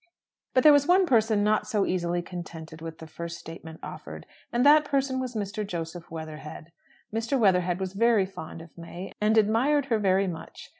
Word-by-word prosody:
But 255 - +5
there 300 - +9
was 285 0 +4
one 370 +2 +5
person 220 -7 +3
not 210 0 +2
so 210 -2 +1
easily 175 -1 -1
contented 165 -3 -8
with 165 -1 -7
the 160 - -10
first 170 +2 -7
statement 160 0 -10
offered; - - -8 0.3
and 240 +2 +1
that 300 +1 +7
person 275 -2 0
was 255 -2 -4
Mr. 210 0 -3
Joseph 170 -3 -6
Weatherhead. 155 0 -8 0.4
Mr. 230 +5 0
Weatherhead 180 -4 +3
was 190 -1 -3
very 225 -1 +3
fond 165 -3 -9
of 165 - -17
May, 175 +2 -8
and 215 +1 +3
admired 245 +7 +3
her 220 - +2
very 195 -1 +2
much. 165 -3 -7
195 Hz, 185 wpm, -27 LUFS, 170-230 Hz, 0.4 s, there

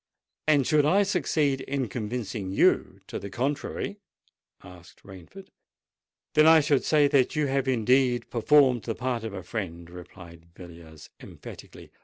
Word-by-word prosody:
"And 145 -4 +3
should 155 -2 +3
I 190 +8 +3
succeed 155 -8 0
in 135 -1 -3
convincing 110 -2 -5
you 95 - +1
to - - -6
the 100 - -8
contrary?" 145 - -4 0.6
asked 90 -1 -16
Rainford. 95 - -13 0.8
"Then 155 0 +5
I 160 0 +7
should 145 -3 +1
say 150 -2 +3
that 135 -3 +1
you 150 -1 +1
had 135 -1 -1
indeed 125 0 +1
performed 130 0 +3
the 115 - -3
part 125 -2 -3
of 110 -2 -6
a 95 - -7
friend," 85 -4 -6
replied 85 -1 -13
Villiers 85 -3 -14
emphatically. - - -13
125 Hz, 145 wpm, -26 LUFS, 95-145 Hz, 0.8 s, I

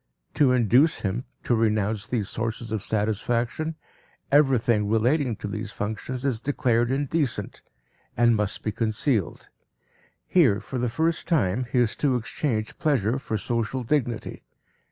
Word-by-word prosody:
To 145 -4 +4
induce 125 - +3
him 105 +5 -2 0.2
to - - +1
renounce 110 -2 +1
these 110 -5 -1
sources 115 +1 -4
of 110 -2 -1
satisfaction, 115 - -1 0.6
everything 120 -7 +3
relating 120 +3 +2
to 105 - -6
these 105 0 -5
functions 110 +6 -4
is 120 -5 0
declared 120 -4 +1
indecent 140 +1 -1 0.6
and 120 0 +4
must 105 -1 -1
be 110 - -1
concealed. 110 - -1 0.8
Here, 130 - +4
for 125 +4 -5
the 125 0 0
first 160 +7 -1
time, 125 - +1
he - - 0
is 120 -2 +2
to 140 -4 +1
exchange 115 -2 -2
pleasure 130 -5 +1
for 110 -4 -3
social 115 +4 -2
dignity. 120 -3 -2
120 Hz, 135 wpm, -25 LUFS, 110-135 Hz, 0.8 s, To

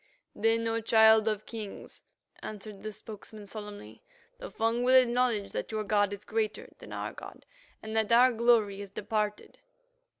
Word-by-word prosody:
"Then, 225 +1 +1
O 225 0 -1
Child 220 0 +5
of 215 -1 -1
Kings," 215 -4 -8 0.4
answered 210 -1 -8
the 215 +1 -5
spokesman 215 0 -10
solemnly, 205 - -9 0.4
"the - - -7
Fung 230 +2 0
will 255 +1 +4
acknowledge 240 -4 +1
that - - -4
your 215 -1 -2
god 205 -1 +2
is 200 0 -7
greater 215 -1 -2
than - - -12
our - - -4
god, - - -11 0.4
and 220 0 -6
that 220 0 +1
our 250 +2 +6
glory 225 -4 +2
is 200 - -8
departed." 210 +1 -3
220 Hz, 160 wpm, -29 LUFS, 205-230 Hz, 0.4 s, our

